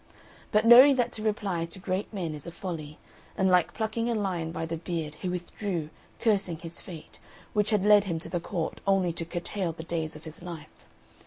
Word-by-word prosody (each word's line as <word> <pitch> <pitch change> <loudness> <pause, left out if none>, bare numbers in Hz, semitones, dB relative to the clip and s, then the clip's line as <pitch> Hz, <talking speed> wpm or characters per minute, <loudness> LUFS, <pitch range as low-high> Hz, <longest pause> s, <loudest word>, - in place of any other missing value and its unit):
But 210 +1 +3
knowing 255 +4 +10
that 245 -2 +1
to 215 - -7
reply 205 -6 -1
to 170 - -8
great 190 +1 -2
men 180 -7 -3
is 150 +2 -8
a - - -5
folly, 160 -4 -6 0.4
and 190 -1 +3
like 180 -2 +3
plucking 225 +1 -1
a 235 - +1
lion 180 -6 -1
by 165 -1 -3
the 165 0 -3
beard, 165 -2 -3
he 180 - -4
withdrew, 180 -2 -3 0.3
cursing 200 -7 +1
his 165 +1 -8
fate, 165 -4 -11 0.3
which 210 0 +2
had 210 -3 +2
led 210 -1 +7
him 170 -4 -1
to - - -1
the 175 - -1
court 165 -1 -3
only 190 -3 +3
to 165 0 -4
curtail 175 +1 -3
the 160 - -8
days 160 -2 -3
of 155 - -11
his 160 0 -10
life. 165 -3 -10
180 Hz, 210 wpm, -28 LUFS, 165-205 Hz, 0.4 s, knowing